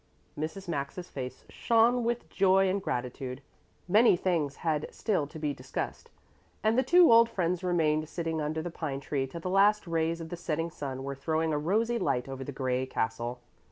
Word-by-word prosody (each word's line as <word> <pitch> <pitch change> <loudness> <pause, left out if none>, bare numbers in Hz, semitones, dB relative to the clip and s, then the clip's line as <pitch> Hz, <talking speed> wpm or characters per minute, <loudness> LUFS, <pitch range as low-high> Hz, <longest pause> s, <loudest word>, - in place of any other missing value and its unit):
Mrs. 160 +6 -5
Maxa's 165 +3 -4
face 130 -2 -6
shone 235 +1 +3
with 235 +1 -1
joy 195 0 +3
and 195 +1 0
gratitude. 125 -4 -4 0.5
Many 210 +1 +5
things 165 -7 0
had 155 -2 0
still 190 -10 -1
to 160 - -10
be 150 -2 -1
discussed, 130 -1 -5 0.5
and 220 +1 +3
the 255 - +4
two 345 +5 +6
old 230 0 +7
friends 180 -3 -1
remained 155 -3 +1
sitting 165 -2 -2
under 155 +1 -2
the 175 - -4
pine 150 -5 -4
tree 140 -1 -2
till 165 +5 -8
the 185 - -3
last 205 +2 +4
rays 165 0 0
of 165 -1 -7
the 175 - -5
setting 165 -1 -2
sun 135 -3 -5
were 140 0 -3
throwing 160 +3 -1
a 150 - +1
rosy 225 +9 +1
light 125 +1 0
over 135 0 -6
the 145 - -6
gray 130 -1 -1
castle. 120 +1 -3
160 Hz, 190 wpm, -29 LUFS, 140-190 Hz, 0.5 s, old